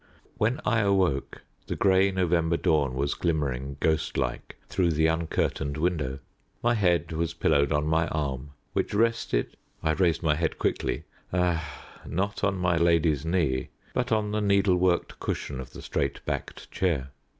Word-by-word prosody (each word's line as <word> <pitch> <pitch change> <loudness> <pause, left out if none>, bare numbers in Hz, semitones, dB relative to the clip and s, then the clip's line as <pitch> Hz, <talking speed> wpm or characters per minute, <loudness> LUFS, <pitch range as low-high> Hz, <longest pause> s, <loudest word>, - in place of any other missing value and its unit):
When 115 +7 +1
I 115 -2 +3
awoke 95 - +1 0.2
the - - -2
grey 95 0 +4
November 85 -3 +1
dawn 70 -5 +1
was 70 +2 0
glimmering, 70 -5 -1
ghost 80 -1 0
like, - - -3
through 85 -3 +1
the 80 +1 +2
uncurtained 80 -3 0
window. 75 -5 0 0.5
My 120 0 +4
head 90 -7 +2
was 80 0 -2
pillowed 70 0 +2
on 75 0 +1
my 80 +1 +2
arm, 70 -3 -3 0.2
which - - -1
rested 115 - +1 0.3
I 80 - +2
raised 85 0 +1
my 75 -2 +3
head 80 +1 -1
quickly - - -1 0.3
ah! 85 -3 -1 0.2
not 100 +5 -2
on 100 -1 +2
my 90 -2 +1
lady's 85 -4 +3
knee, 80 -8 0 0.2
but 125 0 -1
on 105 -1 +1
the 105 0 0
needle 100 -2 +3
worked 90 -1 +1
cushion 70 -2 -3
of 65 - -8
the - - -10
straight 70 - -2
backed - - -5
chair. 75 -8 0
85 Hz, 160 wpm, -27 LUFS, 75-95 Hz, 0.5 s, grey